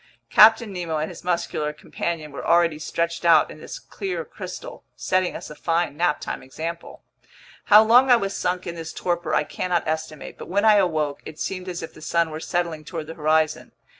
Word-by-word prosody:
Captain 220 Hz, -1 st, +6 dB
Nemo 170 Hz, -3 st, -3 dB
and 155 Hz, +1 st, -2 dB
his -, -, -11 dB
muscular 170 Hz, -4 st, -1 dB
companion 155 Hz, 0 st, -5 dB
were 140 Hz, -, -7 dB
already 170 Hz, -2 st, +3 dB
stretched 170 Hz, +2 st, -2 dB
out 170 Hz, -1 st, +5 dB
in -, -, -11 dB
this -, -, -8 dB
clear 385 Hz, -2 st, -5 dB
crystal, -, -, -9 dB
setting 185 Hz, -1 st, 0 dB
us -, -, -8 dB
a -, -, -9 dB
fine 165 Hz, 0 st, -1 dB
naptime 170 Hz, -1 st, -1 dB
example. 165 Hz, +5 st, -7 dB, 0.6 s
How 210 Hz, 0 st, +8 dB
long 245 Hz, +4 st, +5 dB
I 245 Hz, -, +8 dB
was 195 Hz, -4 st, -2 dB
sunk 180 Hz, 0 st, -2 dB
in 170 Hz, -, -4 dB
this 165 Hz, -1 st, -7 dB
torpor 175 Hz, -2 st, -1 dB
I -, -, +3 dB
cannot 175 Hz, +2 st, -2 dB
estimate; 155 Hz, -1 st, -4 dB
but -, -, -9 dB
when 200 Hz, +4 st, +1 dB
I 215 Hz, -1 st, +7 dB
awoke, 155 Hz, -7 st, 0 dB
it 155 Hz, -, -10 dB
seemed 185 Hz, -1 st, -4 dB
as 175 Hz, -1 st, -5 dB
if 165 Hz, -, -8 dB
the -, -, -14 dB
sun 170 Hz, 0 st, 0 dB
were 155 Hz, -, -5 dB
settling 170 Hz, -2 st, -2 dB
toward 160 Hz, 0 st, -6 dB
the 160 Hz, -, -8 dB
horizon. 155 Hz, -1 st, 0 dB
170 Hz, 195 wpm, -23 LUFS, 155-185 Hz, 0.6 s, How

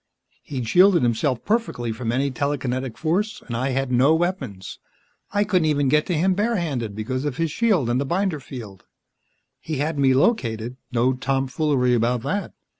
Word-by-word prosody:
He'd 125 Hz, -5 st, -5 dB
shielded 180 Hz, -, +5 dB
himself 120 Hz, +2 st, 0 dB
perfectly 210 Hz, -, -1 dB
from 115 Hz, +1 st, -3 dB
any 135 Hz, +3 st, 0 dB
telekinetic 130 Hz, -4 st, -2 dB
force 195 Hz, +7 st, -1 dB
and 120 Hz, -, -5 dB
I 130 Hz, +3 st, -1 dB
had 135 Hz, 0 st, -1 dB
no 130 Hz, +6 st, +4 dB
weapons. 145 Hz, -, -3 dB, 0.5 s
I 205 Hz, +1 st, +2 dB
couldn't 185 Hz, -6 st, +1 dB
even 145 Hz, -3 st, +2 dB
get 150 Hz, +2 st, +2 dB
to 180 Hz, -4 st, 0 dB
him 185 Hz, +4 st, +3 dB
barehanded 170 Hz, -, -1 dB
because 130 Hz, +5 st, -3 dB
of 145 Hz, -3 st, -3 dB
his 165 Hz, -2 st, 0 dB
shield 200 Hz, -, +2 dB
and 120 Hz, +2 st, +1 dB
the -, -, +1 dB
binder 175 Hz, 0 st, 0 dB
field. 115 Hz, -8 st, -10 dB, 0.7 s
He 160 Hz, -, -5 dB
had 150 Hz, +2 st, -1 dB
me 135 Hz, -1 st, +4 dB
located 120 Hz, -, +1 dB, 0.2 s
no 125 Hz, +1 st, +2 dB
tomfoolery 135 Hz, 0 st, 0 dB
about 120 Hz, 0 st, +1 dB
that. 205 Hz, +1 st, -3 dB
135 Hz, 170 wpm, -23 LUFS, 125-165 Hz, 0.7 s, shielded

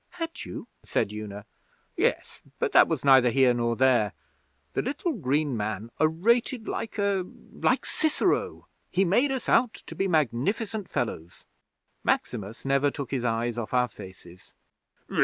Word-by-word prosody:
'Had 330 Hz, -1 st, -5 dB
you?' -, -, -7 dB, 0.2 s
said -, -, -1 dB
Una. 105 Hz, -1 st, -7 dB, 0.5 s
'Yes; -, -, -1 dB, 0.2 s
but -, -, 0 dB
that -, -, +7 dB
was -, -, -2 dB
neither 130 Hz, -2 st, +7 dB
here 125 Hz, +1 st, +4 dB
nor 120 Hz, -1 st, 0 dB
there. 125 Hz, -5 st, +3 dB, 0.6 s
The -, -, +1 dB
little 300 Hz, -, -2 dB
green 145 Hz, -, 0 dB
man 110 Hz, +1 st, -3 dB
orated 220 Hz, -, +2 dB
like 225 Hz, -1 st, -4 dB
a 200 Hz, -2 st, +1 dB, 0.3 s
like -, -, +1 dB
Cicero. 315 Hz, -1 st, 0 dB, 0.2 s
He 190 Hz, +2 st, +2 dB
made 245 Hz, +10 st, +3 dB
us 265 Hz, -2 st, -3 dB
out 240 Hz, -2 st, +3 dB
to -, -, -10 dB
be 190 Hz, +4 st, -1 dB
magnificent 185 Hz, -, 0 dB
fellows. 85 Hz, -7 st, -4 dB, 0.6 s
Maximus 105 Hz, +4 st, -2 dB
never 140 Hz, +1 st, +3 dB
took 140 Hz, -2 st, -6 dB
his 130 Hz, -3 st, -1 dB
eyes 120 Hz, 0 st, -1 dB
off 120 Hz, +2 st, -4 dB
our 125 Hz, 0 st, +3 dB
faces. 95 Hz, -4 st, -13 dB
135 Hz, 145 wpm, -27 LUFS, -, 0.6 s, that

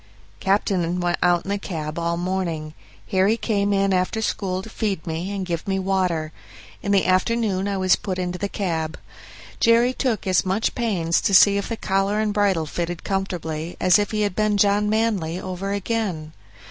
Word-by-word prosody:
Captain 185 Hz, -3 st, +1 dB
went 175 Hz, 0 st, 0 dB
out 175 Hz, -1 st, +3 dB
in -, -, -6 dB
the 200 Hz, 0 st, -1 dB
cab 155 Hz, -4 st, -5 dB
all 170 Hz, 0 st, -1 dB
the 175 Hz, -, -4 dB
morning. 170 Hz, -5 st, -2 dB, 0.4 s
Harry 195 Hz, +3 st, +3 dB
came 205 Hz, -3 st, 0 dB
in 195 Hz, -1 st, +2 dB
after 185 Hz, +4 st, 0 dB
school 190 Hz, -4 st, -2 dB
to -, -, -9 dB
feed 205 Hz, -6 st, -3 dB
me 165 Hz, +3 st, -3 dB
and 200 Hz, -2 st, -3 dB
give 170 Hz, 0 st, -4 dB
me 195 Hz, -1 st, 0 dB
water. 185 Hz, -5 st, 0 dB, 0.5 s
In 200 Hz, -, -2 dB
the 200 Hz, -1 st, +3 dB
afternoon 195 Hz, +1 st, +1 dB
I 200 Hz, -1 st, -1 dB
was 185 Hz, -1 st, +4 dB
put 185 Hz, -2 st, -4 dB
into 180 Hz, 0 st, -3 dB
the 200 Hz, -, -2 dB
cab. 165 Hz, -6 st, -2 dB, 0.6 s
Jerry 235 Hz, +2 st, +4 dB
took 250 Hz, -6 st, -1 dB
as 185 Hz, -1 st, +3 dB
much 195 Hz, +4 st, 0 dB
pains 180 Hz, -9 st, 0 dB
to 195 Hz, -, +2 dB
see 200 Hz, +2 st, +7 dB
if 200 Hz, -, -2 dB
the 230 Hz, -, -3 dB
collar 195 Hz, +1 st, 0 dB
and 215 Hz, -1 st, 0 dB
bridle 200 Hz, -6 st, +2 dB
fitted 170 Hz, +2 st, -4 dB
comfortably 175 Hz, -4 st, -3 dB
as 185 Hz, +2 st, +5 dB
if 205 Hz, -, 0 dB
he 215 Hz, -1 st, -1 dB
had 205 Hz, -3 st, 0 dB
been 215 Hz, -1 st, +1 dB
John 205 Hz, +1 st, +3 dB
Manly 210 Hz, -7 st, 0 dB
over 185 Hz, +2 st, -4 dB
again. 200 Hz, -7 st, -2 dB
190 Hz, 190 wpm, -23 LUFS, 175-205 Hz, 0.6 s, see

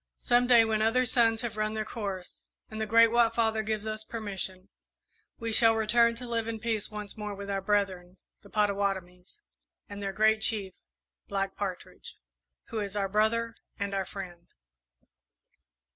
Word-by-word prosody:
Some 245 Hz, 0 st, +2 dB
day, 235 Hz, -2 st, +7 dB
when 220 Hz, -1 st, 0 dB
other 240 Hz, +4 st, +3 dB
suns 230 Hz, -1 st, +3 dB
have 230 Hz, -3 st, -4 dB
run 215 Hz, 0 st, 0 dB
their 215 Hz, 0 st, -2 dB
course, 200 Hz, -5 st, -6 dB, 0.3 s
and 220 Hz, 0 st, -5 dB
the 220 Hz, -, -1 dB
Great 230 Hz, +1 st, +6 dB
White 235 Hz, -1 st, +3 dB
Father 220 Hz, -1 st, +2 dB
gives 215 Hz, 0 st, -3 dB
us 215 Hz, 0 st, -3 dB
permission, 195 Hz, -4 st, -5 dB, 0.7 s
we 230 Hz, -1 st, -3 dB
shall 225 Hz, 0 st, +6 dB
return 230 Hz, +1 st, +3 dB
to 245 Hz, +1 st, -7 dB
live 230 Hz, -1 st, -2 dB
in 225 Hz, -1 st, -4 dB
peace 220 Hz, -2 st, -2 dB
once 210 Hz, -1 st, -7 dB
more 210 Hz, -2 st, -5 dB
with 200 Hz, 0 st, -6 dB
our 195 Hz, -1 st, -1 dB
brethren, 190 Hz, -3 st, -1 dB, 0.2 s
the 200 Hz, -, -16 dB
Pottawattomies, 200 Hz, -, -2 dB, 0.4 s
and 205 Hz, 0 st, -8 dB
their 195 Hz, -1 st, -2 dB
Great 215 Hz, +2 st, +3 dB
Chief, 205 Hz, -4 st, 0 dB, 0.5 s
Black 195 Hz, -1 st, -2 dB
Partridge, 190 Hz, -3 st, -6 dB, 0.5 s
who 225 Hz, -, -3 dB
is 200 Hz, -1 st, -4 dB
our 200 Hz, -1 st, 0 dB
brother 225 Hz, +3 st, +1 dB, 0.2 s
and 200 Hz, 0 st, -3 dB
our 195 Hz, -1 st, -1 dB
friend. 175 Hz, -3 st, -9 dB
215 Hz, 165 wpm, -29 LUFS, 200-225 Hz, 0.7 s, day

